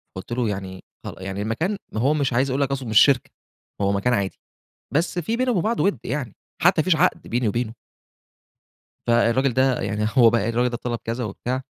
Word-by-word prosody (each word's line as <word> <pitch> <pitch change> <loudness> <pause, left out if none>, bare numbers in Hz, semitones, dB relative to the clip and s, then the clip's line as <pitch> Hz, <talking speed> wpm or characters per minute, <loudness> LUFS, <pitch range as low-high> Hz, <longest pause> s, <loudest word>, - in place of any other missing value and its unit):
فقُلت 95 +5 -8
له 120 -2 0
يعني 95 -2 -6 0.2
خل - - -6
يعني 95 +1 -5
المكان 155 - -1 0.2
ما 110 - -2
هو 140 +5 +3
مش 140 -4 0
عايز 130 +3 +2
أقول 130 +2 0
لك 140 -1 0
أصله 135 -4 -3
مش 110 - +6
شركة، 135 -3 +4 0.5
هو 100 0 +2
مكان 100 +5 +1
عادي، 100 -4 -1 0.6
بس 170 +4 0
في 200 +7 -1
بينا 255 +1 +1
وبين 190 -8 +1
بعض 225 +2 0
وِدّ 195 -9 +2
يعني، 125 -4 -3 0.3
حتى 175 -1 +5
ما - - 0
فيش 180 -3 +3
عقد 180 +4 +2
بيني 120 -1 0
وبينه. 115 +1 -2 1.3
فالراجل 120 +3 +3
ده 130 0 +2
يعني، 105 +2 -1
هو 115 -2 +8
بقى 115 -1 +1
الراجل 120 +2 +1
ده 120 - -4
طلب 120 -1 -3
كذا 115 +2 -3
وبتاع 125 +5 -3
125 Hz, 210 wpm, -23 LUFS, 110-140 Hz, 1.3 s, هو